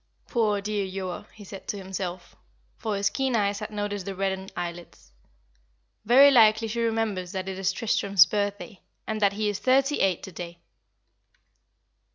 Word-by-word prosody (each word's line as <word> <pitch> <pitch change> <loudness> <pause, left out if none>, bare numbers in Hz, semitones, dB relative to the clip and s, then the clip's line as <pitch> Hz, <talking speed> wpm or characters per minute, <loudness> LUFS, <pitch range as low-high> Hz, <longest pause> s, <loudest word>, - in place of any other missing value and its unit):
"Poor 215 -4 +1
dear 205 -1 -2
Joa," 185 -1 -5
he 215 - -13
said 195 0 -10
to 205 - -3
himself, 185 -2 -6 0.4
for 215 -2 -3
his 200 0 +1
keen 265 -2 0
eyes 200 -2 +1
had 210 - -5
noticed 205 -2 -4
the 195 - -4
reddened 190 0 -2
eyelids. 175 - -7 0.9
"Very 270 +5 +7
likely 225 -3 +5
she 235 +2 -2
remembers 220 -5 -1
that 190 -1 -4
it 190 0 -5
is 195 - +1
Tristram's 200 -5 +4
birthday, 205 0 -3 0.2
and 215 0 -3
that 200 -1 +3
he 210 +1 -1
is 205 -1 -2
thirty 275 +3 +2
eight 190 -3 +1
to 190 - -8
day." 170 0 -8
200 Hz, 165 wpm, -26 LUFS, 190-220 Hz, 0.9 s, Very